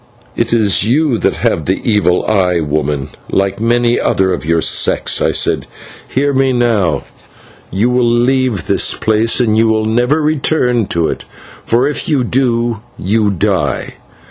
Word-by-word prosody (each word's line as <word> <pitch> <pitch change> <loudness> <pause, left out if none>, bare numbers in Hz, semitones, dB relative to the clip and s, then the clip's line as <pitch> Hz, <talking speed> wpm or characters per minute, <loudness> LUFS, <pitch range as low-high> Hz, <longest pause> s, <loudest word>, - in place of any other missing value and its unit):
"It 115 0 -1
is 110 -5 +2
you 130 +2 +1
that - - 0
have - - -1
the - - -1
evil 105 -5 +2
eye, 90 -5 +1
woman, 75 -2 -2 0.2
like 100 0 0
many 120 +1 +1
another 95 -1 +1
of - - -4
your 85 0 +2
sex!" - - +1
I - - +2
said. - - 0 0.4
"Hear 140 +2 0
me, 135 -1 +1
now: 115 -8 +1 0.7
you 105 +7 0
will 125 -1 +2
leave 120 -4 +1
this - - +1
place, 110 +2 +1
and 110 -3 +1
you 115 +1 +3
will 110 0 +1
never 120 +7 +1
return 135 -7 0
to 85 -2 0
it, - - -4 0.4
for 120 +3 +1
if 150 - -1
you 140 -5 +1
do, 120 -3 -1 0.2
you 105 +2 0
die! 95 -8 -2
115 Hz, 160 wpm, -14 LUFS, 95-125 Hz, 0.7 s, you